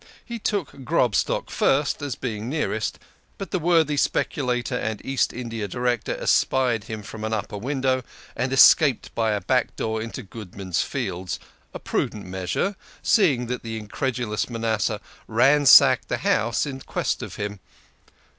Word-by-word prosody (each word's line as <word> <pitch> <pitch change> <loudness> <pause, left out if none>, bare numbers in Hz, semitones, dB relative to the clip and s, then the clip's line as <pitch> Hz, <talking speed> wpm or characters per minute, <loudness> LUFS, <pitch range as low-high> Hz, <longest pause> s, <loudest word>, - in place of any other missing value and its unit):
He 235 -1 -6
took 190 -10 -3
Grobstock 125 - +1
first 140 +1 +1
as 145 -3 -3
being 110 -2 -4
nearest, 130 -7 -1 0.4
but 195 - -7
the 185 - 0
worthy 160 -3 +3
speculator 125 -3 0
and 110 -3 -2
East 135 -1 +1
India 115 -3 -4
Director 120 +2 -1
espied 120 -5 +2
him 110 -2 -6
from 110 +2 -8
an 110 0 -2
upper 105 -1 -3
window, 130 +1 0 0.3
and 130 +2 -1
escaped 135 -1 +5
by 110 -2 +1
a 105 - -1
back - - 0
door 110 0 -2
into 115 +1 -6
Goodman's 95 -4 -4
Fields 90 +1 -3 0.3
a - - -6
prudent - - -2
measure, 95 - -2 0.3
seeing 145 - +3
that 125 +1 -4
the 115 -1 -5
incredulous 115 0 -2
Manasseh 115 -2 -1 0.3
ransacked 135 +5 +6
the - - -1
house 115 +4 +1
in 135 -2 -5
quest - - -2
of - - -7
him. 105 -1 -4
120 Hz, 145 wpm, -24 LUFS, 110-135 Hz, 0.4 s, ransacked